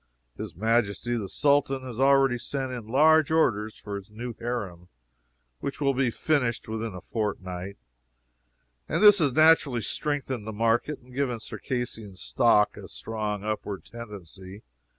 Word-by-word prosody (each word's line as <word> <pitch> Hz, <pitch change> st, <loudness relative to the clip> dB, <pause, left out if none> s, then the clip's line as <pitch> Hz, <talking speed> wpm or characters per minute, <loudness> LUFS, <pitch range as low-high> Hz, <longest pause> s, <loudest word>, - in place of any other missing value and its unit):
His 105 Hz, -6 st, -7 dB
Majesty 115 Hz, +3 st, +1 dB
the 105 Hz, -5 st, -3 dB
Sultan 140 Hz, -2 st, +2 dB
has 125 Hz, -2 st, -7 dB
already 135 Hz, -2 st, +4 dB
sent 135 Hz, +1 st, -3 dB
in 120 Hz, -4 st, -6 dB
large 155 Hz, +5 st, +5 dB
orders 110 Hz, -10 st, +1 dB
for 100 Hz, -1 st, -6 dB
his 100 Hz, +1 st, -11 dB
new 120 Hz, +3 st, -6 dB
harem, 100 Hz, -8 st, -4 dB, 0.7 s
which 140 Hz, -, -5 dB
will 140 Hz, -2 st, +2 dB
be 130 Hz, -1 st, +1 dB
finished 125 Hz, -2 st, 0 dB
within 110 Hz, -2 st, -4 dB
a 90 Hz, -, -7 dB
fortnight, 95 Hz, -3 st, -4 dB, 1.1 s
and -, -, +1 dB
this 205 Hz, -1 st, +9 dB
has 145 Hz, -6 st, +2 dB
naturally 155 Hz, -5 st, +5 dB
strengthened 135 Hz, -7 st, -2 dB
the -, -, -3 dB
market 115 Hz, +7 st, +1 dB
and 125 Hz, 0 st, -17 dB
given 125 Hz, -3 st, -1 dB
Circassian 115 Hz, -4 st, -5 dB
stock 105 Hz, +2 st, +2 dB
a -, -, -9 dB
strong 105 Hz, -, -4 dB
upward 105 Hz, -2 st, -4 dB
tendency. 100 Hz, -3 st, -10 dB
115 Hz, 145 wpm, -27 LUFS, 105-135 Hz, 1.1 s, this